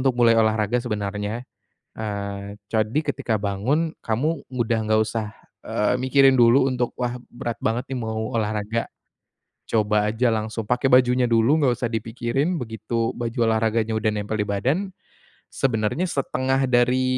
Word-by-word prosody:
untuk 130 -1 +1
mulai 120 -2 +5
olahraga 110 +1 +2
sebenarnya, 105 0 -3 0.5
eee, 100 -2 -4 0.2
jadi 110 +5 +1
ketika 135 -8 -2
bangun 130 - -1
kamu 140 +9 -1
udah 120 -2 0
enggak 110 0 +3
usah, 110 0 -3 0.3
eee, 105 +4 +1
mikirin 130 +1 +4
dulu 120 +3 +5
untuk, 125 -2 -1
"Wah, 125 0 -3 0.2
berat 120 -1 -4
banget 120 +4 -2
nih 130 - -3
mau 110 0 -3
olahraga," 110 +1 -1 0.9
coba 105 -1 +2
aja 120 +3 +1
langsung 110 0 -3
pakai 125 +2 +1
bajunya 125 0 +5
dulu, 115 +6 +4
enggak 125 -3 +2
usah 120 - 0
dipikirin, 120 - -1
begitu 115 0 -2
baju 120 +1 -4
olahraganya 110 0 +1
udah 110 0 +1
nempel 105 +1 -3
di 105 - 0
badan, 135 - -1 0.6
sebenarnya 115 +5 0
setengah 135 -2 0
dari, 125 +1 +3
115 Hz, 145 wpm, -23 LUFS, 110-130 Hz, 0.9 s, mulai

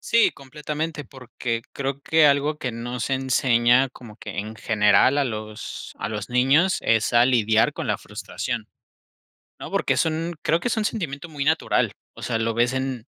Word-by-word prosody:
Sí, 230 0 +3
completamente, 150 +2 -5
porque 125 -3 -5
creo 140 0 -3
que 160 +1 +4
algo 145 +2 +2
que 130 - -3
no 120 +2 -5
se 135 +4 0
enseña 130 -1 +3
como 120 -4 -13
que - - -8
en 110 +2 -4
general 110 +6 +3
a 140 - +2
los 110 -3 -6
a - - -3
los 105 0 -5
niños 135 +9 +3
es 115 +1 +2
a 120 0 +6
lidiar 110 -3 +3
con - - -5
la - - 0
frustración, - - -5 0.9
¿no? - - -8
Porque - - +1
son 165 +1 -1
creo 165 +1 +2
que 245 - -2
es - - 0
un 215 - 0
sentimiento 165 -8 -4
muy 145 -2 -4
natural. 160 +1 +2 0.2
O - - -12
sea, 115 -2 -1
lo 115 0 -1
ves 120 +2 +1
en 130 -2 -3
130 Hz, 185 wpm, -23 LUFS, 115-150 Hz, 0.9 s, a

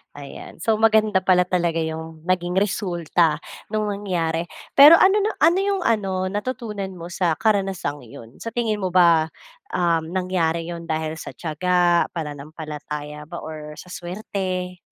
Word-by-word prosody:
Ayan 140 -1 -10
so 220 -1 +2
maganda 215 -3 +4
pala 185 -1 +4
talaga 175 -2 0
yung 160 0 -6
naging 180 0 0
resulta 175 -5 +1 0.2
nung 215 -1 -1
nangyari. 175 -5 -2 0.2
Pero 290 +4 +10
ano 385 +4 +5
na 420 +2 0
ano 350 +3 +5
yung 395 -1 0
ano 190 -4 0
natutunan 210 -3 -4
mo 170 0 -8
sa 170 -2 +1
karanasang 195 - -1
yun? 115 +2 -13
Sa 230 0 -7
tingin 225 -3 0
mo 190 - -1
ba 170 -3 +4 0.5
um 170 0 0
nangyari 175 -3 0
yun 170 -1 -7
dahil 160 0 -2
sa - - -8
tiyaga, 175 +2 +2
pananampalataya 150 -1 -6
ba, 170 - -8
or 150 -1 -8
sa 180 - -11
swerte? 185 0 -4
180 Hz, 145 wpm, -22 LUFS, 160-200 Hz, 0.5 s, Pero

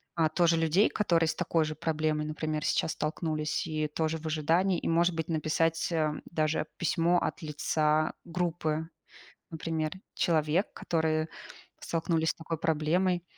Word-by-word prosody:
а, 160 -2 +3
тоже 170 +1 +3
людей, 165 +6 +3
которые 170 -6 +2
с - - -1
такой 165 -2 +1
же 155 0 -4
проблемой, 155 -1 0
например, 155 0 -3
сейчас - - +1
столкнулись 155 0 -2
и 155 -1 -1
тоже 160 +1 -1
в 160 - -12
ожидании, 165 +5 +2
и, - - -4
может 170 +1 +3
быть, 160 -1 -2
написать, 165 +1 0
эм, 155 -2 0
даже 155 -2 0
письмо 170 +1 +2
от - - -3
лица 155 0 +1
группы, 165 -2 -2 0.6
например, 160 -1 -2 0.2
человек, 160 +2 +2
которые 160 -1 0 0.5
столкнулись 165 -1 0
с - - -2
такой 165 0 -5
проблемой, 170 +3 +1
160 Hz, 145 wpm, -29 LUFS, 155-165 Hz, 0.6 s, а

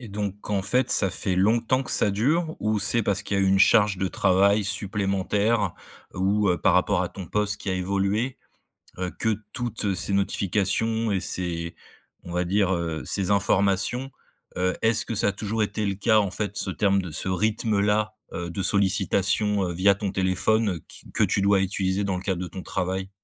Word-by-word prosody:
Et 120 - -9
donc 100 0 -5
en 100 -2 0
fait, 125 +5 0
ça 100 - +4
fait 95 0 -2
longtemps 115 +6 +2
que - - -4
ça 105 - +4
dure 155 - 0
ou 105 0 0
c'est 115 +3 +4
parce 100 -1 0
qu'il 100 - -2
y - - +1
a - - +2
eu - - +2
une 95 - +3
charge 105 0 +4
de 95 - -1
travail 100 +3 +2
supplémentaire? 100 0 0 0.4
Ou, 100 +2 +1
heu, 90 - 0
par - - +2
rapport 90 0 +2
à 90 - -3
ton 95 0 -9
poste 105 +3 -1
qui 100 - -4
a 95 - 0
évolué, 100 +6 -1 0.6
heu, 90 -1 -3
que 110 -2 0 0.2
toutes, 120 -3 -2
heu, 100 -2 0
ces 90 +2 +1
notifications 105 +3 0
et 95 - 0
ces 85 -2 -3 0.5
on 85 - -8
va 90 +1 0
dire, 95 +1 +1
heu, 85 -2 -3
ces 100 -1 -1
informations, 100 +6 +1 0.5
heu, 90 0 0
est-ce 110 0 +3
que 115 - -4
ça 105 - +3
a - - 0
toujours 110 +2 -3
été 105 0 -2
le 100 - -1
cas, 110 +2 +3
en 100 -3 -1
fait, 105 +1 -4
ce 95 - 0
terme 100 +1 +1
de 90 - -7
ce 75 - +1
rythme-là, 105 +1 0 0.2
heu, 85 0 -5
de 95 +3 -4
sollicitation, 100 +1 +2
heu, - - -3
via 100 +3 +4
ton 100 0 -4
téléphone, 95 +3 +1
heu, 85 -4 -5
qui - - -10
que - - +2
tu 100 - 0
dois 100 -1 +3
utiliser 95 +1 -1
dans 95 -2 -1
le 90 - -6
cadre 95 -3 -2
de 90 - -5
ton 95 +2 -8
travail? 95 +1 -3
100 Hz, 210 wpm, -24 LUFS, 95-105 Hz, 0.6 s, ça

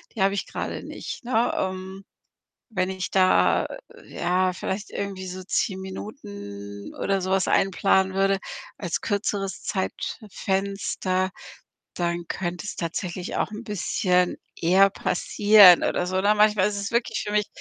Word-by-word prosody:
die 215 - -3
habe 195 +1 +3
ich 200 - -2
grade - - -4
nicht“, - - -7
ne, 240 -1 +2
ähm, 190 +1 -4 0.6
wenn 185 -5 -1
ich 185 -1 -4
da, 185 -1 +4 0.4
ja, 185 +1 0
vielleicht 190 +3 -4
irgendwie 195 -2 -4
so 185 0 -7
10 190 0 0
Minuten 105 - -8
oder 195 -1 0
so 185 +1 -3
was 190 0 +2
einplanen 190 0 +2
würde 195 0 +2 0.4
als 175 -4 -3
kürzeres 200 -2 -2
Zeitfenster, 190 -2 -2 0.6
dann 170 0 -2
könnte 175 0 -3
es - - -4
tatsächlich 175 +2 -4
auch - - 0
'n 215 +2 -6
bisschen 180 -4 +1 0.2
eher 190 +4 +5
passieren 200 0 +6
oder 180 - 0
so, 185 +1 0
ne, 205 +2 +4
manchmal 210 -2 +4
ist 210 - -4
es 200 - -4
wirklich 235 0 0
für 210 - -4
mich 210 -1 +2
190 Hz, 145 wpm, -25 LUFS, 185-205 Hz, 0.6 s, passieren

